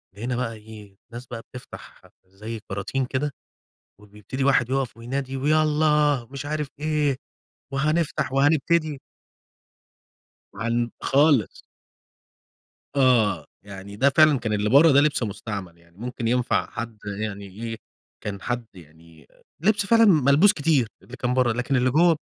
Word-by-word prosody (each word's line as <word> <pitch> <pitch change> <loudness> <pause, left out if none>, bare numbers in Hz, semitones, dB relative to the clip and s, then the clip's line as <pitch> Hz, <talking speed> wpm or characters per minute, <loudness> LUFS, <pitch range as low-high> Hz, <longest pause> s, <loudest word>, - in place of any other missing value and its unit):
لقينا 120 +4 -3
بقى 120 -2 -2
إيه؟ 105 -2 -13
ناس 120 +2 -8
بقى 115 -2 -7
بتفتح 125 +1 -12 0.2
زي 105 +4 -8
كراتين 100 +7 -2
كده 140 +3 -2 0.7
وبيبتدي 105 +6 -6
واحد 130 -3 +3
يُقَف 135 -3 -1
وينادي: 130 +3 -4
"ويالّا 150 -2 +2
مش 140 +1 -6
عارف 150 -1 -3
إيه 150 -3 0 0.6
وهنفتح 155 -1 0
وهنبتدي." 150 +1 +2 1.5
عن 115 +3 -1
خالص. 140 -4 +2 1.3
آه 110 - +3 0.2
يعني 100 0 -10
ده 135 +6 +4
فعلًا 155 -2 +5
كان 110 -2 -3
اللي 105 0 0
بره 145 +5 +7
ده 140 - +6
لبس 150 -3 +1
مستعمل 100 -4 -5
يعني، 85 0 -25
ممكن 120 +1 -4
ينفع 125 +1 0
حد 115 -1 -6 0.2
يعني 100 -2 -4
إيه؟ 115 +4 -6 0.4
كان 100 -1 -6
حد 120 -1 -3
يعني 80 -2 -17 0.3
لبس 205 +3 +2
فعلًا 230 +2 +5
ملبوس 155 - +5
كتير 145 - +1
اللي 125 - -11
كان 125 -1 -1
بره 125 -2 +2
لكن 125 +4 -1
اللي 130 0 +2
جوه 165 +4 +4
125 Hz, 135 wpm, -24 LUFS, 110-145 Hz, 1.5 s, بره